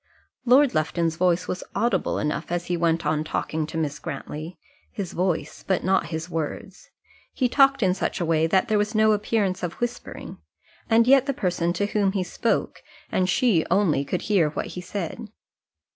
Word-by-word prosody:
Lord 260 +2 +5
Lufton's 165 +1 0
voice 180 +1 +1
was 185 - -3
audible 205 -3 0
enough 150 +2 -2
as 175 0 -1
he 180 - -1
went 165 -1 +1
on 155 0 +1
talking 155 0 -2
to 160 - -6
Miss 150 -2 -2
Grantly 155 +2 -6 0.3
his 195 -4 -5
voice, 180 -2 -2
but 190 - +1
not 190 +1 +2
his 160 0 -4
words. 165 -3 -5 0.5
He 255 - +2
talked 275 0 +4
in 185 -1 +3
such 185 - -2
a 175 - 0
way 160 0 +2
that 190 +3 +2
there 215 -1 +2
was 210 +2 -1
no 215 0 +5
appearance 205 -3 0
of 175 -2 -3
whispering, 240 0 -5 0.5
and 230 0 +5
yet 270 +1 +5
the 275 - -1
person 175 -4 0
to 205 +3 0
whom 200 -2 +1
he 195 -2 0
spoke, - - -1 0.3
and 185 0 +1
she 205 -6 +3
only, 175 -7 +2
could 175 +5 -3
hear 190 -8 +2
what 150 - -4
he 180 - -6
said. 200 +4 -5
180 Hz, 185 wpm, -24 LUFS, 165-210 Hz, 0.5 s, Lord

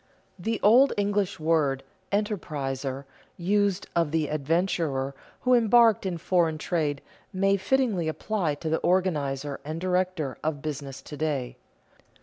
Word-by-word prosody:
The 225 +5 -2
old 250 +7 +6
English 205 -3 0
word 155 -4 +1 0.3
"enterpriser," 140 -10 -2 0.3
used 200 +2 +1
of 170 -3 +2
the 155 -1 0
"adventurer" 155 -3 0 0.3
who 255 - +3
embarked 230 -3 +5
in 175 -2 -2
foreign 165 -2 +1
trade, 150 -3 -1 0.3
may 195 +1 +2
fittingly 210 -5 +1
apply 165 -1 -1
to 160 +2 -4
the 160 - +2
organizer 145 -7 0
and 155 +2 -5
director 180 -6 -1
of 155 -2 -1
business 140 -3 -5
to 150 - -8
day. 145 -5 -2
165 Hz, 130 wpm, -27 LUFS, 145-195 Hz, 0.3 s, old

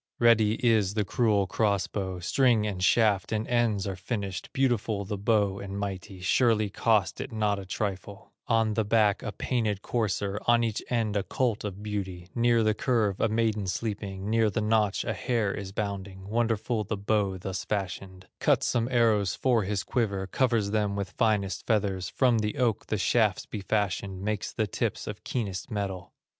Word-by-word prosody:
Ready 110 -2 +5
is 105 -3 +3
the 105 -2 +1
cruel 105 -3 +2
cross 100 0 +1
bow, 95 -3 -4
String, 115 +4 +2
and 95 -3 -3
shaft, 105 -2 +3
and 110 0 -1
ends 115 -5 +1
are 100 -2 -3
finished, 100 -1 -4
Beautiful 115 -6 0
the 105 - -3
bow 100 -1 +1
and 100 0 -6
mighty, 95 -1 -5
Surely 110 0 +2
cost 110 -2 +1
it - - -6
not 105 -2 0
a 95 - -9
trifle; 100 +2 -4 0.2
On 115 -2 +2
the 110 - +1
back 105 -1 +2
a 105 - -4
painted 110 -4 -1
courser, 105 -3 -1
On 120 0 +5
each 110 -2 -1
end 115 -4 0
a 100 - +2
colt 120 -1 -1
of 100 0 -6
beauty, 95 -4 -4
Near 120 -1 +3
the 110 0 +3
curve 105 -4 0
a 115 - +3
maiden 110 -2 0
sleeping, 100 0 -3
Near 110 0 +3
the 105 - -2
notch 105 -2 +1
a - - -2
hare 115 -6 0
is 100 -2 -6
bounding, 100 -2 -5
Wonderful 115 0 0
the 105 +1 -3
bow 100 -1 0
thus 95 +1 -4
fashioned; 95 -2 -4
Cuts - - +3
some 115 -1 +1
arrows 110 -6 +2
for 120 -6 +2
his 100 0 -1
quiver, 100 -6 -1
Covers 115 -1 +1
them 105 -2 0
with 100 -2 -3
finest 105 -4 0
feathers, 100 -5 0
From 125 -4 +2
the 105 0 -2
oak 120 -5 0
the 110 - -1
shafts 105 -1 +2
he 105 - -4
fashions, 100 -2 -1
Makes 105 -1 -2
the 110 - 0
tips 100 - -2
of - - -7
keenest 100 -6 -3
metal. 100 -4 -4
105 Hz, 180 wpm, -28 LUFS, 100-115 Hz, 0.2 s, Ready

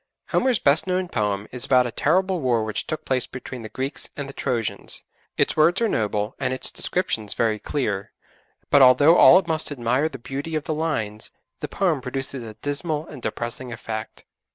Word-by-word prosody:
Homer's 255 -3 +2
best 145 +3 +4
known 185 0 0
poem 105 - -1
is 125 -1 -4
about 125 -1 +4
a 120 - -3
terrible 185 +7 +1
war 120 -4 +2
which 110 -1 -3
took 155 - -4
place 130 -1 0
between 130 -1 -8
the 110 - -8
Greeks 135 +5 -4
and 145 - -4
the 140 - -8
Trojans. 120 -6 -2 0.3
Its - - +2
words 170 +4 +4
are 230 - +2
noble, 105 - -1
and 130 -1 0
its - - +1
descriptions 115 - -2
very 110 -2 +1
clever, 105 -9 -2 0.6
but 140 - +6
although 145 +6 +7
all 185 - +9
must 160 -2 0
admire 130 +3 0
the 135 - -8
beauty 140 +6 -5
of 155 - -1
the 155 - -2
lines, 115 -10 -2 0.3
the - - -4
poem 175 -8 0
produces 135 0 -3
a 110 -2 -9
dismal 150 +3 -3
and - - -10
depressing 120 +2 -4
effect. 110 -1 -6
135 Hz, 185 wpm, -23 LUFS, 115-155 Hz, 0.6 s, all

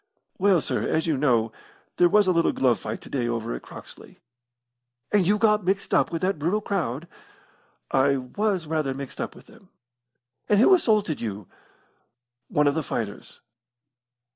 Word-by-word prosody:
"Well, 190 -3 +4
sir, - - -2
as 160 - 0
you 160 -3 +1
know, 120 -5 +2 0.5
there 175 - +5
was 210 +3 +4
a 185 - +3
little 170 -2 +2
glove 125 -3 +2
fight 110 +1 -6
to - - -13
day 125 -4 -1
over 115 - -3
at - - -6
Croxley." - - -13 0.9
"And 200 -4 +3
you 210 +2 +3
got 210 -1 +3
mixed 190 +2 -1
up - - +3
with 165 0 -3
that 185 -4 0
brutal 175 +8 0
crowd?" 170 - -3 0.8
"I 135 +1 +3
was 185 +8 -2
rather 150 -4 -1
mixed 135 -1 -7
up - - -5
with - - -15
them." - - -19 0.8
"And 205 - +4
who 315 - +6
assaulted 215 - +2
you?" 105 -3 -5 1.0
"One 150 - +1
of 145 - +3
the 160 - -1
fighters." 110 -7 -6
160 Hz, 165 wpm, -25 LUFS, 130-200 Hz, 1.0 s, who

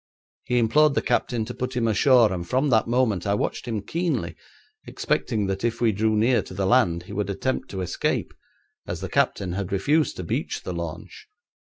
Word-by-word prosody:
He 125 - 0
implored 140 +6 +4
the - - +2
captain 115 -3 0
to 125 - -6
put 125 +1 -4
him 120 -2 +1
ashore, 115 -1 +4
and 85 -1 -5
from 135 +2 +1
that 110 -1 +3
moment 115 -7 +1
I 100 - +2
watched 105 - -3
him 110 -4 -3
keenly, 140 - -2 0.5
expecting 105 -3 -1
that 95 0 -3
if 120 0 -1
we 115 -2 +3
drew 110 +2 +1
near 115 +4 +3
to 95 - -11
the 100 0 -1
land 95 -7 +3
he - - -10
would 100 0 -2
attempt 130 +7 -2
to 95 - -4
escape, 90 - -2 0.5
as - - -4
the - - -4
captain 95 -3 0
had 95 +1 -4
refused 145 +11 +1
to 90 - -4
beach 80 - -3
the 90 - -4
launch. 85 - -7
110 Hz, 200 wpm, -24 LUFS, 95-125 Hz, 0.5 s, implored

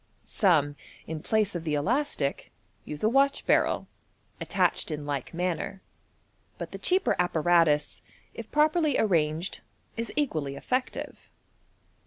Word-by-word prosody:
Some, 150 - +2 0.3
in 160 -1 -5
place 215 +1 +1
of 175 -2 -4
the 155 -2 -1
elastic, 225 - -1 0.3
use 150 -1 -6
a - - +5
watch 275 +4 +2
barrel, - - +2 0.5
attached - - +1
in 150 -2 -4
like 140 -3 -3
manner 175 0 -2
j 195 - -17 0.8
but - - -6
the - - -7
cheaper 370 +1 +2
apparatus, 165 -3 +2 0.3
if - - -8
properly 310 +1 +3
arranged, 165 -3 +1 0.4
is 230 0 -3
equally 155 - -1
effective. 255 - -3
175 Hz, 125 wpm, -28 LUFS, 150-250 Hz, 0.8 s, a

